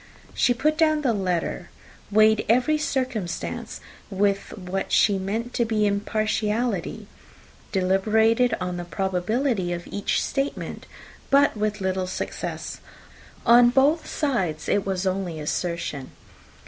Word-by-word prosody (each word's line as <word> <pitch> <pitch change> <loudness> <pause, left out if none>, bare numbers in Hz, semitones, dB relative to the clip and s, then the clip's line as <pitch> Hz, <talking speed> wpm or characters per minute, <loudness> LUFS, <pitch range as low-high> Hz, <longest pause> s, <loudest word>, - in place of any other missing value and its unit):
She 245 - +2
put 305 +5 0
down 310 -2 +3
the 245 -4 +2
letter, 185 -5 -2 0.4
weighed 215 +1 +4
every 255 +7 +3
circumstance 255 - -3 0.3
with 200 +1 -1
what 190 0 -4
she 200 -2 +4
meant 220 +6 -3
to 235 - +1
be 220 -2 +1
impartiality 215 0 -1 0.7
deliberated 220 +6 +2
on 180 -1 -3
the 175 - -4
probability 190 +3 -1
of 175 0 -5
each 205 - -1
statement 275 +1 -3 0.4
but 280 -1 +4
with 210 -1 -2
little 190 -1 -1
success. 185 - -5 0.7
On 240 +1 +7
both 280 +6 +3
sides 190 - -1
it 200 -1 +1
was 190 -1 -1
only 185 -4 -2
assertion. 155 -3 -3
210 Hz, 120 wpm, -24 LUFS, 185-245 Hz, 0.7 s, On